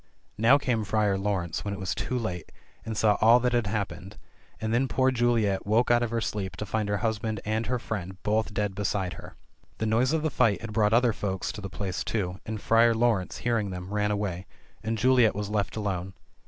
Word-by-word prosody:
Now 120 Hz, +6 st, +6 dB
came 120 Hz, -6 st, 0 dB
Friar 105 Hz, -1 st, +1 dB
Laurence 95 Hz, -4 st, -2 dB
when 100 Hz, -1 st, -3 dB
it -, -, -9 dB
was 95 Hz, 0 st, -2 dB
too 130 Hz, -, -2 dB
late, 90 Hz, -8 st, -4 dB, 0.3 s
and 110 Hz, -1 st, -5 dB
saw 105 Hz, -2 st, +3 dB
all 115 Hz, +3 st, +7 dB
that 125 Hz, 0 st, +1 dB
had 120 Hz, -3 st, +1 dB
happened 95 Hz, -2 st, -4 dB, 0.2 s
— -, -, -31 dB
and 110 Hz, 0 st, -2 dB
then 130 Hz, +3 st, +2 dB
poor 130 Hz, 0 st, +2 dB
Juliet 115 Hz, -6 st, +1 dB
woke 115 Hz, +4 st, +3 dB
out 120 Hz, 0 st, +4 dB
of 120 Hz, -, 0 dB
her 115 Hz, 0 st, -1 dB
sleep 100 Hz, -3 st, -3 dB
to 105 Hz, -, -5 dB
find 105 Hz, +1 st, -2 dB
her 105 Hz, -, +1 dB
husband 110 Hz, -1 st, -1 dB
and 110 Hz, +2 st, -1 dB
her 125 Hz, -, 0 dB
friend 95 Hz, -5 st, -5 dB
both 110 Hz, +1 st, 0 dB
dead 105 Hz, -1 st, -1 dB
beside 95 Hz, -2 st, -1 dB
her. -, -, -11 dB, 0.4 s
The 110 Hz, -, -2 dB
noise 115 Hz, +5 st, +2 dB
of 160 Hz, -1 st, 0 dB
the 155 Hz, -, 0 dB
fight 105 Hz, -2 st, +2 dB
had 115 Hz, -2 st, -6 dB
brought 105 Hz, 0 st, +2 dB
other 120 Hz, 0 st, +4 dB
folks 95 Hz, -3 st, -3 dB
to 105 Hz, -, -8 dB
the 100 Hz, -, -5 dB
place 95 Hz, -1 st, -3 dB
too. 95 Hz, -4 st, -2 dB
and 110 Hz, -1 st, -3 dB
Friar 115 Hz, +2 st, +4 dB
Laurence 110 Hz, -5 st, +1 dB
hearing 115 Hz, -4 st, +1 dB
them 90 Hz, +1 st, -6 dB
ran 105 Hz, 0 st, +1 dB
away, 95 Hz, -3 st, -2 dB, 0.3 s
and 110 Hz, 0 st, -2 dB
Juliet 125 Hz, -1 st, +4 dB
was 105 Hz, 0 st, -3 dB
left 100 Hz, -3 st, -1 dB
alone. 95 Hz, -3 st, -3 dB
105 Hz, 220 wpm, -27 LUFS, 100-115 Hz, 0.4 s, all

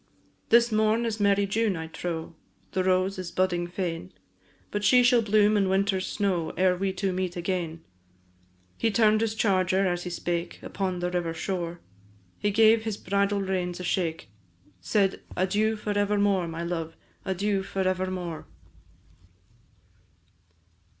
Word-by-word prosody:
"This 235 Hz, 0 st, +5 dB
morn 220 Hz, +2 st, +2 dB
is 225 Hz, -1 st, -2 dB
merry 200 Hz, 0 st, +3 dB
June, 205 Hz, -1 st, 0 dB
I 160 Hz, -, -4 dB
trow, 165 Hz, 0 st, -5 dB, 0.4 s
The 185 Hz, -, 0 dB
rose 185 Hz, +1 st, +1 dB
is 185 Hz, -2 st, -5 dB
budding 175 Hz, -2 st, 0 dB
fain; 175 Hz, -, -4 dB, 0.6 s
But 205 Hz, 0 st, -2 dB
she 250 Hz, +4 st, +6 dB
shall 245 Hz, -1 st, +5 dB
bloom 210 Hz, 0 st, +3 dB
in 195 Hz, -2 st, +2 dB
winter 190 Hz, 0 st, +1 dB
snow, 185 Hz, -5 st, -1 dB
Ere 185 Hz, 0 st, +3 dB
we 190 Hz, +1 st, -1 dB
two 190 Hz, 0 st, -2 dB
meet 185 Hz, -1 st, -2 dB
again." 170 Hz, -2 st, -3 dB, 1.0 s
He 225 Hz, -, +2 dB
turn'd 215 Hz, 0 st, +3 dB
his 225 Hz, -1 st, 0 dB
charger 190 Hz, -2 st, +2 dB
as 175 Hz, -1 st, 0 dB
he 180 Hz, -, -5 dB
spake, 175 Hz, 0 st, -3 dB
Upon 185 Hz, -2 st, -3 dB
the 180 Hz, 0 st, -1 dB
river 170 Hz, -2 st, -2 dB
shore, 175 Hz, -1 st, -4 dB, 0.6 s
He 205 Hz, -, +1 dB
gave 220 Hz, +2 st, +5 dB
his 220 Hz, -2 st, -3 dB
bridle 200 Hz, +1 st, 0 dB
reins 185 Hz, -2 st, -2 dB
a -, -, -5 dB
shake, 170 Hz, -, -2 dB, 0.5 s
Said, 195 Hz, -, +1 dB, 0.2 s
"Adieu 205 Hz, +4 st, +1 dB
for 210 Hz, -1 st, -3 dB
evermore, 205 Hz, -3 st, +2 dB
my 165 Hz, +1 st, -5 dB
love! 165 Hz, -2 st, -4 dB, 0.3 s
And 190 Hz, -, -2 dB
adieu 200 Hz, +1 st, 0 dB
for 190 Hz, 0 st, -2 dB
evermore." 185 Hz, -3 st, -3 dB
190 Hz, 150 wpm, -27 LUFS, 175-205 Hz, 1.0 s, she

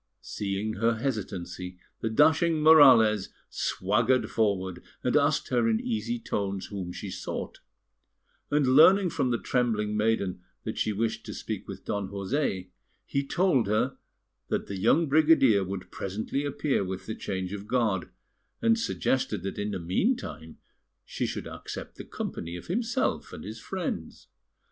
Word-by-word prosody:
Seeing 100 Hz, +1 st, -3 dB
her 115 Hz, +2 st, +2 dB
hesitancy, 95 Hz, -7 st, -4 dB, 0.2 s
the 110 Hz, -, -1 dB
dashing 160 Hz, +6 st, +4 dB
Morales 130 Hz, -10 st, +7 dB, 0.2 s
swaggered 115 Hz, +7 st, +1 dB
forward, 95 Hz, -5 st, 0 dB, 0.2 s
and 125 Hz, -, +1 dB
asked 145 Hz, 0 st, +2 dB
her 120 Hz, -3 st, +2 dB
in 110 Hz, -1 st, +2 dB
easy 115 Hz, +2 st, -2 dB
tones 100 Hz, -4 st, -3 dB
whom 95 Hz, -4 st, -5 dB
she 95 Hz, +2 st, -6 dB
sought; -, -, -5 dB, 0.9 s
and 145 Hz, -1 st, +2 dB
on 130 Hz, -, +3 dB
learning 180 Hz, +5 st, +7 dB
from 130 Hz, -, 0 dB
the 120 Hz, -, +1 dB
trembling 110 Hz, -4 st, 0 dB
maiden 105 Hz, -4 st, 0 dB, 0.2 s
that -, -, -4 dB
she 110 Hz, -, +1 dB
wished 110 Hz, +2 st, -1 dB
to -, -, -6 dB
speak -, -, -5 dB
with -, -, -8 dB
Don 100 Hz, -2 st, -2 dB
José, 100 Hz, -2 st, -2 dB, 0.4 s
he 140 Hz, -, -1 dB
told 140 Hz, -, +2 dB
her 110 Hz, +6 st, +1 dB, 0.5 s
that -, -, -1 dB
the 100 Hz, -1 st, -5 dB
young 145 Hz, -, +4 dB
brigadier 140 Hz, -8 st, +5 dB
would 95 Hz, 0 st, -6 dB
presently 110 Hz, +9 st, -3 dB
appear 140 Hz, -4 st, 0 dB
with 95 Hz, 0 st, -5 dB
the 110 Hz, -, -4 dB
change 95 Hz, -2 st, -4 dB
of 100 Hz, 0 st, -7 dB
guard, 110 Hz, -8 st, 0 dB, 0.5 s
and 230 Hz, 0 st, +3 dB
suggested 130 Hz, -, -1 dB
that 95 Hz, -, -4 dB
in 105 Hz, +1 st, -1 dB
the 100 Hz, -, -2 dB
meantime 85 Hz, -, -2 dB, 0.5 s
she -, -, -2 dB
should -, -, -4 dB
accept -, -, -8 dB
the -, -, -7 dB
company 85 Hz, +1 st, -5 dB
of 90 Hz, -, -8 dB
himself 230 Hz, +7 st, -1 dB
and -, -, -8 dB
his -, -, -7 dB
friends. -, -, -5 dB
110 Hz, 155 wpm, -28 LUFS, 95-140 Hz, 0.9 s, Morales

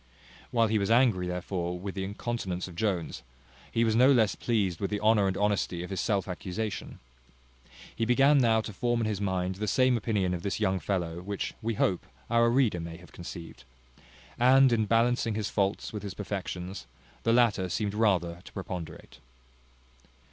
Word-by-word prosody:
While 115 Hz, -1 st, +3 dB
he 110 Hz, 0 st, +1 dB
was 100 Hz, -, -1 dB
angry 115 Hz, -7 st, +3 dB
therefore 90 Hz, 0 st, -3 dB
with 95 Hz, +1 st, -5 dB
the 95 Hz, -, -3 dB
incontinence 95 Hz, -3 st, -3 dB
of 90 Hz, -, -11 dB
Jones, 85 Hz, -9 st, -2 dB, 0.5 s
he 115 Hz, 0 st, +2 dB
was 110 Hz, -1 st, +2 dB
no 130 Hz, +4 st, +6 dB
less 115 Hz, -6 st, +4 dB
pleased 100 Hz, -8 st, -1 dB
with 100 Hz, -, -2 dB
the 105 Hz, -, -2 dB
honour 105 Hz, -2 st, +4 dB
and 95 Hz, -, -1 dB
honesty 100 Hz, -4 st, 0 dB
of 90 Hz, -, -8 dB
his 95 Hz, -, -1 dB
self 100 Hz, -4 st, 0 dB
accusation. 95 Hz, +3 st, -4 dB, 1.0 s
He 115 Hz, -, -1 dB
began 135 Hz, +4 st, +5 dB
now 115 Hz, -3 st, +3 dB
to 110 Hz, -, -7 dB
form 120 Hz, +3 st, 0 dB
in -, -, 0 dB
his 105 Hz, -2 st, -2 dB
mind 95 Hz, -1 st, -1 dB
the 105 Hz, +1 st, -3 dB
same 130 Hz, +4 st, +3 dB
opinion 100 Hz, -5 st, 0 dB
of 90 Hz, -, -3 dB
this 100 Hz, +3 st, -2 dB
young 95 Hz, -3 st, +1 dB
fellow, 90 Hz, -4 st, -2 dB
which, 100 Hz, +1 st, -4 dB
we 115 Hz, 0 st, -2 dB
hope, 95 Hz, -3 st, 0 dB, 0.2 s
our 115 Hz, 0 st, +4 dB
reader 120 Hz, -7 st, +2 dB
may 85 Hz, 0 st, -6 dB
have 90 Hz, -3 st, -16 dB
conceived. 85 Hz, 0 st, -9 dB, 0.8 s
And 130 Hz, +1 st, +6 dB
in 110 Hz, -2 st, +1 dB
balancing 115 Hz, 0 st, +2 dB
his 105 Hz, -2 st, -2 dB
faults 100 Hz, +1 st, -1 dB
with 105 Hz, -, -4 dB
his 100 Hz, -2 st, -6 dB
perfections, 95 Hz, -5 st, -5 dB, 0.3 s
the 115 Hz, -, +1 dB
latter 115 Hz, -6 st, +3 dB
seemed 105 Hz, +2 st, -1 dB
rather 90 Hz, -6 st, +1 dB
to -, -, -13 dB
preponderate. 90 Hz, -8 st, -7 dB
100 Hz, 180 wpm, -29 LUFS, 90-115 Hz, 1.0 s, no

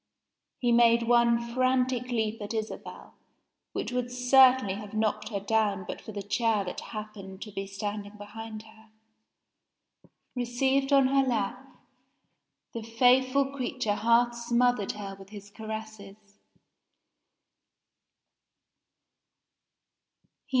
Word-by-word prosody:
He 240 Hz, -2 st, +1 dB
made 235 Hz, 0 st, +5 dB
one 235 Hz, -1 st, +4 dB
frantic 255 Hz, -1 st, +1 dB
leap 225 Hz, -3 st, -2 dB
at 205 Hz, +2 st, -5 dB
Isabel, 220 Hz, 0 st, -6 dB, 0.6 s
which -, -, -4 dB
would 250 Hz, 0 st, -2 dB
certainly 250 Hz, -3 st, +5 dB
have 205 Hz, +1 st, -8 dB
knocked 215 Hz, -1 st, -1 dB
her 205 Hz, -3 st, -3 dB
down 205 Hz, -2 st, 0 dB
but -, -, -6 dB
for -, -, -9 dB
the 200 Hz, -1 st, -5 dB
chair 215 Hz, +1 st, +1 dB
that 180 Hz, -, -5 dB
happened 210 Hz, -3 st, -8 dB
to 210 Hz, -, -10 dB
be 195 Hz, 0 st, -5 dB
standing 205 Hz, +1 st, -5 dB
behind 215 Hz, +1 st, -8 dB
her. 220 Hz, 0 st, -18 dB, 1.5 s
Received 265 Hz, +3 st, 0 dB
on 275 Hz, -1 st, +6 dB
her 275 Hz, 0 st, +4 dB
lap, 250 Hz, +2 st, -3 dB, 1.0 s
the 230 Hz, -, -4 dB
faithful 255 Hz, +4 st, +3 dB
creature 255 Hz, -4 st, -1 dB
half 235 Hz, +3 st, +3 dB
smothered 235 Hz, -2 st, +1 dB
her 200 Hz, -2 st, -7 dB
with 195 Hz, 0 st, -13 dB
his 205 Hz, -1 st, -11 dB
caresses. 220 Hz, -2 st, -8 dB
225 Hz, 110 wpm, -28 LUFS, 210-250 Hz, 1.5 s, on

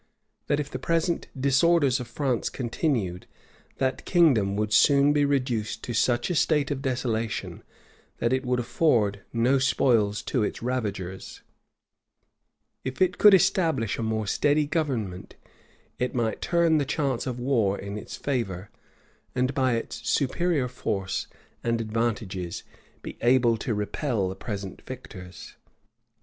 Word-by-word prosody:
That 145 Hz, -, +1 dB
if 145 Hz, -, -4 dB
the 130 Hz, -, -4 dB
present 165 Hz, +4 st, 0 dB
disorders 140 Hz, 0 st, +3 dB
of 125 Hz, -, -6 dB
France 125 Hz, -1 st, -1 dB
continued, 115 Hz, -, -2 dB, 0.5 s
that 130 Hz, 0 st, -1 dB
kingdom 130 Hz, -, +3 dB
would 105 Hz, 0 st, -1 dB
soon 140 Hz, +5 st, +5 dB
be 145 Hz, -1 st, +3 dB
reduced 125 Hz, -6 st, -1 dB
to 120 Hz, -, -4 dB
such 120 Hz, +6 st, +1 dB
a -, -, -1 dB
state 150 Hz, -2 st, +2 dB
of 140 Hz, -2 st, -2 dB
desolation, 120 Hz, -4 st, -2 dB, 0.6 s
that 120 Hz, +2 st, 0 dB
it 130 Hz, +1 st, 0 dB
would 125 Hz, -1 st, 0 dB
afford 115 Hz, -6 st, +1 dB
no 125 Hz, +4 st, +2 dB
spoils 120 Hz, -5 st, +2 dB
to 125 Hz, -, -1 dB
its 105 Hz, -, -2 dB
ravagers, 100 Hz, -7 st, -4 dB, 1.4 s
if 130 Hz, 0 st, -5 dB
it 185 Hz, -1 st, +2 dB
could 210 Hz, -2 st, +9 dB
establish 165 Hz, -, +1 dB
a -, -, -1 dB
more 110 Hz, -1 st, -1 dB
steady 145 Hz, +8 st, +2 dB
government, 130 Hz, -, -3 dB, 0.6 s
it 125 Hz, 0 st, -1 dB
might 115 Hz, -3 st, -1 dB
turn 170 Hz, -2 st, +3 dB
the -, -, +1 dB
chance 135 Hz, -3 st, -1 dB
of 125 Hz, -1 st, -3 dB
war 115 Hz, -6 st, +1 dB
in 100 Hz, +1 st, -6 dB
its 105 Hz, -, -7 dB
favor, 105 Hz, -9 st, -3 dB, 0.6 s
and 130 Hz, +1 st, +1 dB
by 130 Hz, -2 st, +2 dB
its 115 Hz, -, -4 dB
superior 150 Hz, 0 st, +1 dB
force 100 Hz, -6 st, -3 dB, 0.4 s
and 115 Hz, -1 st, 0 dB
advantages 110 Hz, -5 st, -2 dB, 0.4 s
be -, -, -8 dB
able 120 Hz, -1 st, +4 dB
to 110 Hz, 0 st, -2 dB
repel 105 Hz, -1 st, -1 dB
the 95 Hz, -, -5 dB
present 100 Hz, -4 st, -6 dB
victors. 95 Hz, -8 st, -10 dB
125 Hz, 140 wpm, -26 LUFS, 110-140 Hz, 1.4 s, could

